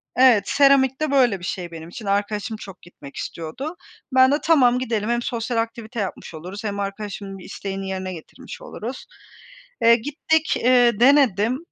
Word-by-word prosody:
evet. 250 -6 +6
Seramik 275 -1 +4
de 310 -2 0
böyle 245 -8 +3
bir 175 - -8
şey 180 -2 -4
benim 165 0 -9
için. 210 +5 -9
Arkadaşım 205 +2 -1
çok 195 -3 -11
gitmek 150 -5 -14
istiyordu. 215 - -6 0.4
Ben 260 0 +5
de 290 - +2
"Tamam, 255 -7 +4
gidelim. 225 -4 -2
Hem 240 0 +1
sosyal 235 0 -3
aktivite 230 +1 -3
yapmış 195 -3 -5
oluruz 180 +7 -8
hem 205 -2 -3
arkadaşımın 200 0 -5
bir 185 - -12
isteğini 195 -1 -5
yerine 190 -1 -4
getirmiş 180 - -11
oluruz." 260 - -7 0.8
Eee, 230 0 +7
gittik, 295 +5 0
ııı, 245 -3 +4
denedim. 250 -4 +4
225 Hz, 165 wpm, -22 LUFS, 195-260 Hz, 0.8 s, Eee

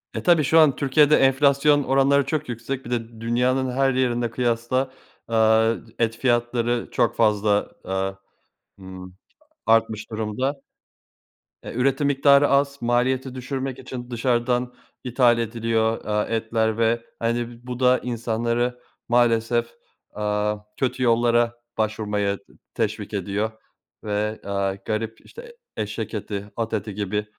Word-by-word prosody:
E, - - -3
tabii 170 -3 +4
şu 160 +4 +4
an 155 -4 +5
Türkiye'de 145 +2 +4
enflasyon 140 +2 +4
oranları 135 +1 +3
çok 150 0 -2
yüksek. 130 +3 -5
Bir 120 - -7
de 115 -1 -4
dünyanın 125 +3 +1
her 135 +1 +2
yerine 120 -2 0
kıyasla, 120 +2 0 0.4
eee, 110 0 +3 0.2
et 115 -1 0
fiyatları 120 -1 0
çok 120 -1 +1
fazla, 105 -2 +2
aaa, 95 0 -2 0.7
ımm, 95 -1 -10 0.5
artmış 110 -1 +2
durumda. 110 +6 -2 1.0
E, - - -7
üretim 135 +4 +1
miktarı 140 0 +5
az, 140 0 +2
maliyeti 125 +2 0
düşürmek 130 0 -4
için 125 -1 -8
dışarıdan 120 +1 0 0.3
ithal 120 -1 +3
ediliyor, 115 0 -1
aaa, 105 0 0
etler 110 -1 0
ve 115 0 +1 0.2
hani 120 0 -2
bu 125 -1 -5
da 125 0 +4
insanları 120 +1 -1 0.3
maalesef, 120 -1 +2 0.5
aaa, 105 0 -1 0.2
kötü 130 0 -1
yollara 120 0 +3 0.2
başvurmaya 105 -2 -1 0.4
teşvik 110 -2 -3
ediyor 100 +2 -2 0.5
ve, 105 +1 -2
aaa, 100 -1 -1
garip 110 +1 -3
işte, 475 0 -13 0.2
eşek 110 +1 -4
eti, 105 -1 -5
at 115 -1 -3
eti 105 -1 -3
gibi 105 +1 -2
120 Hz, 125 wpm, -23 LUFS, 110-130 Hz, 1.0 s, an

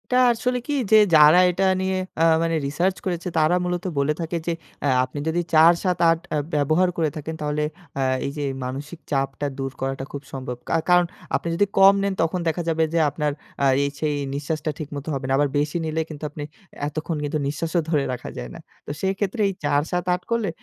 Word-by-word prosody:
এটা 250 - +4 0.2
আসলে 250 +2 -1
কি 295 - -1 0.2
যে 220 - +8 0.2
যারা 155 +3 +8
এটা 190 +2 0 0.2
নিয়ে 190 0 0 0.2
আ - - +5 0.2
মানে 165 0 0
রিসার্চ 175 +7 0
করেছে 175 -1 -2
তারা 155 +2 +4
মূলত 180 0 -2
বলে 140 +2 +2
থাকে 165 +1 -2
যে, 170 - +1 0.3
আ - - +3 0.2
আপনি 130 +3 -5
যদি 165 +2 +1
৪ 160 +2 +8
৭ 180 -2 +1
৮ 165 0 +3 0.2
আ - - +2 0.2
ব্যবহার 155 +5 +3
করে 160 -2 +2
থাকেন, 155 +1 -5
তাহলে 150 0 -1 0.4
আ - - +1 0.2
এই 140 - -2
যে 145 - -2 0.2
মানসিক 145 +6 -6
চাপটা 135 0 -1
দূর 135 0 -2
করাটা 135 0 -2
খুব 140 - -6
সম্ভব। 130 -2 -5
কা - - +1
কারণ 180 0 +6 0.3
আপনি - - -2
যদি 205 - +3
কম 195 0 +8
নেন, 200 -1 0
তখন 165 +2 -1
দেখা 165 +2 0
যাবে 160 0 +2
যে 170 - +3
আপনার 150 +1 -1 0.3
আ - - +5 0.2
এই 140 - 0
সেই 150 -1 0 0.2
নিঃশ্বাসটা 155 +2 -2
ঠিকমতো 145 -1 -6
হবে 135 -1 -3
না। 135 - 0
আবার 145 0 +2
বেশি 150 +3 -1
নিলে 160 0 -1
কিন্তু 155 -1 -9
আপনি 150 0 -7 0.4
এতক্ষণ 155 +2 -3
কিন্তু 150 +1 -1
নিঃশ্বাসও 165 +4 -1
ধরে 150 -4 +2
রাখা 125 - -6
যায় - - -5
না। - - -9 0.3
তো - - -5
সেক্ষেত্রে 195 +3 -1 0.2
৪ 145 0 +2
৭ 180 -1 0
৮ 180 - -2
করলে 230 -4 +1
155 Hz, 210 wpm, -23 LUFS, 145-180 Hz, 0.4 s, যে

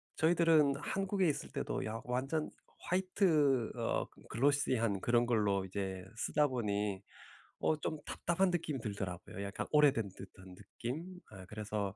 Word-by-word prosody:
저희들은 160 -3 +4
한국에 190 +4 0
있을 150 - -1
때도 - - -2
야 110 +1 -3
완전 135 +5 -1 0.3
화이트 165 - +2
어 - - 0 0.2
글로시한 120 -6 +2
그런 120 0 +3
걸로 105 -5 +2
이제 95 -1 -4
쓰다 150 +6 +2
보니 105 -6 -1 0.6
어 155 - +2
좀 155 +1 -3
답답한 180 +3 +1
느낌이 160 -5 -1
들더라고요. 95 -3 -5
약간 100 0 -4
오래된 140 -8 +4
듯한 95 -1 -12
느낌 150 - -6
어 95 -3 -10
그래서 105 -1 -3
125 Hz, 290 characters per minute, -34 LUFS, 100-155 Hz, 0.6 s, 저희들은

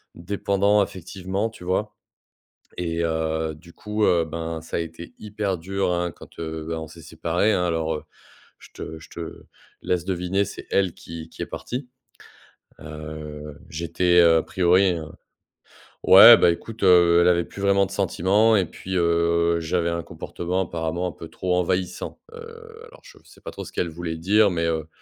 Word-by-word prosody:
«dépendant 100 +3 +1
affectivement», 95 +3 -3
tu 110 - -14
vois? 95 +4 -1 0.8
Et 85 -1 -1
heu, 80 -1 -1
du 85 +3 -16
coup, 105 0 -2
heu, 85 -2 +3
ben, 80 0 -5
ça 80 - -3
été 85 +1 -8
hyper 105 -3 -3
dur 95 +2 -1
hein 85 -1 -1
quand, - - -16
heu, 80 -1 -5
bah 80 -1 -3
on 80 - -6
s'est 85 - -13
séparés 85 +7 0
hein. 90 - +1
Alors, 80 -1 -1
heu, - - -9 0.6
je - - -15
te 80 0 -8
je - - -15
te 85 -1 -8 0.4
laisse 90 -2 -1
deviner, 95 +1 0
c'est 100 - -9
elle 95 -3 +2
qui 85 -1 -9
qui - - -11
est - - -4
partie, 125 +2 -6 0.9
heu, 75 -1 -8
j'étais, 85 +2 +1
heu, 85 -1 +6
a - - 0
priori, 90 +1 +3
heu 80 - -6 1.0
ouais - - +10
bah, - - +5
écoute, 110 +6 -7
heu, 85 -2 +6
elle 85 - +4
avait 85 -1 +3
plus 100 - -10
vraiment 100 0 +4
de - - -14
sentiment 105 +5 +2
et 95 - +2
puis, 95 - -8
heu, 85 0 +2
j'avais 85 +1 0
un 85 0 -3
comportement, 85 +2 -4
apparemment, 85 +1 -3
un - - -4
peu 80 - -10
trop 90 +2 -1
envahissant, 90 0 -2
heu, 460 -1 -12
alors - - -17
je - - -16
f - - -26
sais - - -19
pas - - -7
trop - - -8
ce - - -10
qu'elle 85 - -1
voulait 80 0 -5
dire, 100 +5 +3
mais, 85 -1 -1
heu, 80 -1 -2
85 Hz, 180 wpm, -23 LUFS, 80-95 Hz, 1.0 s, ouais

